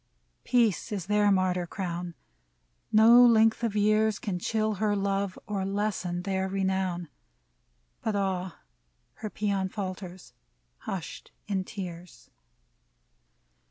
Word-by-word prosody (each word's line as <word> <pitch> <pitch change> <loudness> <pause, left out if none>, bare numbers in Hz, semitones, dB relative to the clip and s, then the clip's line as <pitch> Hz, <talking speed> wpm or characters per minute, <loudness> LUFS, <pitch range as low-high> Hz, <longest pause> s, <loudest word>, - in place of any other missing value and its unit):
Peace 230 -9 +2
is 195 -4 -3
their 210 +1 +3
martyr 185 -2 +1
crown: 175 -2 -4 0.8
No 230 +3 +8
length 225 -1 +5
of 225 -3 -1
years 215 0 +3
Can 190 -4 -3
chill 215 +3 0
her 210 -1 +2
love 195 -1 -1
or 205 -3 -2
lessen 190 -3 -2
their 190 -1 -1
renown! 190 -2 -1 0.5
— - - -44
But 220 -2 -1
ah! 190 -3 -2 0.6
her 215 - -5
paean 200 -2 -1
falters, 185 -2 -7 0.6
hushed 185 -5 -6 0.2
in 190 -2 -1
tears. 180 -3 -9
195 Hz, 115 wpm, -28 LUFS, 180-210 Hz, 0.8 s, No